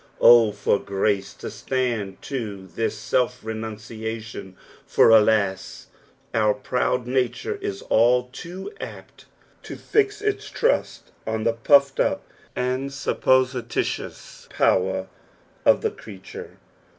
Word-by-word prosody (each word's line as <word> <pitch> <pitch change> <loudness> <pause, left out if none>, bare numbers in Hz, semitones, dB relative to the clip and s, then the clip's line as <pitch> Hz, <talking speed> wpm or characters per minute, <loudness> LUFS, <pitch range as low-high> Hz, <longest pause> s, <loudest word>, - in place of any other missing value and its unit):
O 115 -3 +7
for 100 0 +1
grace 100 0 -1
to - - -7
stand 120 -7 -2
to 105 -8 -5
thin 110 +6 -1
self 125 +3 -1
renunciation, 110 -2 -6 0.3
for, - - +4
alas! 105 -3 +2 0.4
our 105 -2 +3
proud 125 -1 -1
nature 130 - -1
is 400 0 -4
all 125 +2 +3
too 180 - -8
apt - - -10 0.4
to - - -8
fix 420 -1 +1
its 420 0 -2
trujt - - 0 0.3
on 110 0 -1
the 115 0 +2
pufTed 140 +4 +4
iip - - +1 0.4
and 130 +2 -1
supposilitious 130 -3 -1
power 95 0 +1 0.6
of - - +5
the - - 0
creature. 95 -3 -11
115 Hz, 115 wpm, -24 LUFS, 105-130 Hz, 0.6 s, O